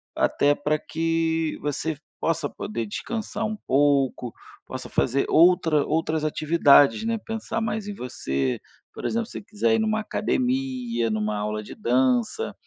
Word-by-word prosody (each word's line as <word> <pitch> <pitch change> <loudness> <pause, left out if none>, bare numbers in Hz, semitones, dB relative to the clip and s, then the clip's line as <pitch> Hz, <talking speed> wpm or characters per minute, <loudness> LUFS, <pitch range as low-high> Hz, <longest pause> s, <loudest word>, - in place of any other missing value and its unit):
até 145 0 +3
para 150 +1 0
que 165 0 -1
você 145 +1 -2 0.2
possa 165 -3 0
poder 115 +1 -4
descansar 220 - -4
um 215 0 -2
pouco, 135 - +1 0.3
possa - - -7
fazer 135 +3 +1
outra 165 -3 +4
outras 160 0 0
atividades, 155 +3 +4
né, 230 0 0
pensar 225 +1 -4
mais 215 -2 -2
em 205 - -4
você. 70 - -2 0.3
Por - - -8
exemplo, 230 0 -1
se - - -13
você - - -6
quiser 225 +2 0
ir 225 - +1
em - - +1
uma 215 0 0
academia, 250 - -1
em 110 - -1
uma 105 0 -1
aula 105 +1 -3
de - - -9
dança, 125 -1 +1
160 Hz, 155 wpm, -25 LUFS, 130-215 Hz, 0.3 s, outra